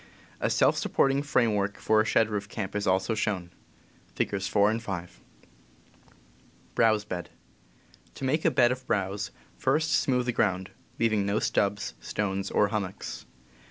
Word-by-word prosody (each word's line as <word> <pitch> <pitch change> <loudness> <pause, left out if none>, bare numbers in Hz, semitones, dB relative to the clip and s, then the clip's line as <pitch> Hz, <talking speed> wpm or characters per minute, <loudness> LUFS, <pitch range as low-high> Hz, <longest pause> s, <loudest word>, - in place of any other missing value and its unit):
A - - 0
self - - +3
supporting 135 0 +2
framework 105 -8 +1
for 110 0 +3
a - - -1
shed 110 0 +3
roof 105 -2 -4
camp 100 -2 -5
is 105 - -1
also 95 +3 +2
shown. 95 -5 -2 0.6
(Figs. 100 -1 -1
4 100 +2 +3
and 115 +1 -2
5.) 90 - -6 1.6
To 105 - -3
make 150 +5 +1
a - - +5
bed 120 -2 +4
of 130 0 -5
browse, 100 +1 -1 0.3
first 155 +4 +1
smooth 125 -2 +2
the 125 - +1
ground, 95 -5 0 0.3
leaving 110 -3 +2
no 100 +1 +1
stubs, 100 -1 0
stones, 100 -2 -2
or 105 - +2
hummocks. 100 -3 -4
105 Hz, 140 wpm, -28 LUFS, 95-115 Hz, 1.6 s, a